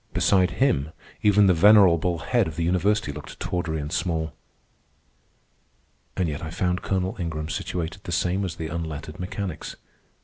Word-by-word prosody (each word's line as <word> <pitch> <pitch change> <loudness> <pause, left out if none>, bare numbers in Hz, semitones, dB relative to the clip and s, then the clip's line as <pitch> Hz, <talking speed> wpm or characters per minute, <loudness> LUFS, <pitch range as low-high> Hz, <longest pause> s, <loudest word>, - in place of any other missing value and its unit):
Beside 95 -2 +3
him 80 - +2 0.3
even 105 0 +5
the 95 - +5
venerable 90 -2 +5
head - - +1
of 80 - -6
the 85 - -2
university 90 0 +1
looked 75 +1 -10
tawdry 85 -3 -2
and 75 0 -5
small. 80 -4 -1 1.8
And 90 -3 +1
yet 75 -2 -4
I 80 - -5
found 90 +2 -1
Colonel 95 -1 -1
Ingram 80 -3 -3
situated 90 +3 -4
the 85 - -5
same 90 +4 0
as 90 -4 -3
the 80 -2 -5
unlettered 80 -1 -5
mechanics. 90 -2 -5
85 Hz, 150 wpm, -25 LUFS, 80-95 Hz, 1.8 s, even